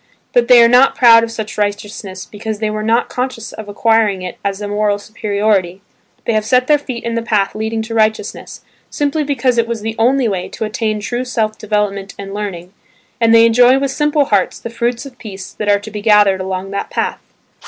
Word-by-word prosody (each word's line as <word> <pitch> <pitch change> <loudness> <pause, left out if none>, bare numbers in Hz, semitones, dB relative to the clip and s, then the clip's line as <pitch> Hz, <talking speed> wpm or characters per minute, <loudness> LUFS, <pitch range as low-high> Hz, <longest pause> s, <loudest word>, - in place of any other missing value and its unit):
But 240 -1 +3
they 245 -2 +8
are - - +7
not 250 +3 +5
proud 230 -3 +7
of 230 - -2
such 220 -2 -6
righteousness 205 -2 -4
because 215 +1 -6
they 215 0 -2
were 215 0 -3
not 225 +3 +1
conscious 250 -3 -4
of 215 -1 -9
acquiring 210 -2 +1
it 180 - -7
as 200 0 -2
a 205 - -4
moral 205 0 0
superiority. 200 -3 -1 0.4
They 230 - 0
have 215 0 +1
set 250 +3 +2
their 295 +1 +3
feet 255 -4 -6
in 235 - -3
the 230 - -1
path 210 -4 0
leading 220 +1 -3
to 225 +1 -7
righteousness, 220 -1 -1 0.3
simply 295 +1 -1
because 260 -4 0
it 230 - +1
was 230 -2 -4
the 225 +1 -4
only 255 +2 +3
way 190 -4 -3
to 220 - -4
attain 215 0 -2
true 240 +4 -3
self 220 -4 -2
development 205 -2 -2
and 195 0 -7
learning; 195 -3 -6 0.5
and 230 -1 +3
they 230 0 +7
enjoy 245 +3 +5
with 275 0 -1
simple 295 0 +1
hearts 200 -6 +1
the 230 - -8
fruits 235 +2 -2
of 255 -3 -12
peace 195 -4 -9
that 210 - -3
are 205 0 +4
to 210 +2 -10
be 210 0 -6
gathered 205 -3 +4
along 190 +1 -4
that 200 - -4
path. - - -2
220 Hz, 215 wpm, -16 LUFS, 205-235 Hz, 0.5 s, they